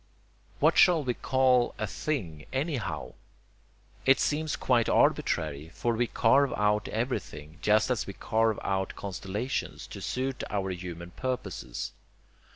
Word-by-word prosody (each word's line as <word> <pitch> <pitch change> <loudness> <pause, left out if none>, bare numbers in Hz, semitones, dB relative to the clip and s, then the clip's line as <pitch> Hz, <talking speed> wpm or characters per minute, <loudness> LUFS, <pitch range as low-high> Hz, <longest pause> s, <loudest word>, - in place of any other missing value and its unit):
What - - +4
shall 175 -5 +6
we 125 -2 0
call 130 -1 +2
a 110 - -1
THING 95 - -4
anyhow? 135 -2 -2 0.9
It 135 0 +5
seems 155 0 0
quite 120 -3 +2
arbitrary, 75 0 +1
for 120 - 0
we 120 +1 +1
carve 135 +5 +3
out 105 0 +1
everything, 85 - -4
just 110 +4 +3
as 125 - -1
we 100 - -5
carve 110 +1 +1
out 95 -1 -1
constellations, 100 +6 -4
to - - -9
suit 130 0 -2
our 95 -2 -1
human 85 -1 -7
purposes. 125 - -4
110 Hz, 130 wpm, -29 LUFS, 95-130 Hz, 0.9 s, shall